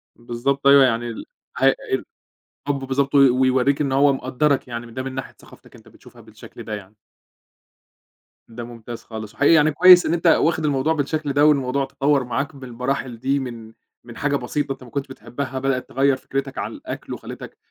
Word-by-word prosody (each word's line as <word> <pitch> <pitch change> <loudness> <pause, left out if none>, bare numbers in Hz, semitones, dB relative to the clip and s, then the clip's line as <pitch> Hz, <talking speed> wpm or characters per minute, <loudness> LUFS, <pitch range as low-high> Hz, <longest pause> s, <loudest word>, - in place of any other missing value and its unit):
بالضبط 120 +4 -2
أيوه 140 -1 +8
يعني 120 -1 0
ال 115 - -7 0.3
ه - - +1
ال - - 0 0.6
الحب 145 -1 0
بالضبط 135 +1 0
وي 140 -1 +7
ويورّيك 130 +2 +2
إن 140 - 0
هو 140 +1 +4
مقدّرك 135 +2 0
يعني 120 -1 -6
من 115 - -13
ده 130 - -4
من 130 0 -6
ناحية 135 - -6
ثقافتك - - -18
أنت - - -18
بتشوفها - - -17
بالشكل - - -13
ده 110 - -6
يعني. 100 0 -12 1.5
ده 120 +1 -8
ممتاز 120 0 -9
خالص، 110 -1 -8
وحقيقي 145 +3 +4
يعني 155 -1 +5
كويس 180 +3 +7
إن 160 - 0
أنت 170 0 0
واخد 160 -1 +3
الموضوع 145 +2 +1
بالشكل 150 -1 -2
ده 145 +1 +4
والموضوع 140 -2 +2
تطوَّر 140 0 +1
معاك 140 +5 -3
بالمراحل 125 -1 -4
دي 135 +3 0
من 115 -4 -8 0.3
من 120 0 -12
حاجة 145 0 0
بسيطة 140 +2 -2
أنت 130 - -15
ما 125 - -13
كنتش 140 +2 -4
بتحبها 130 0 -6
بدئت 135 -1 -2
تغيّر 135 +1 +2
فكرتك 135 0 -5
عن - - -3
الأكل - - -7
وخلّتك - - -9
135 Hz, 185 wpm, -21 LUFS, 125-140 Hz, 1.5 s, أيوه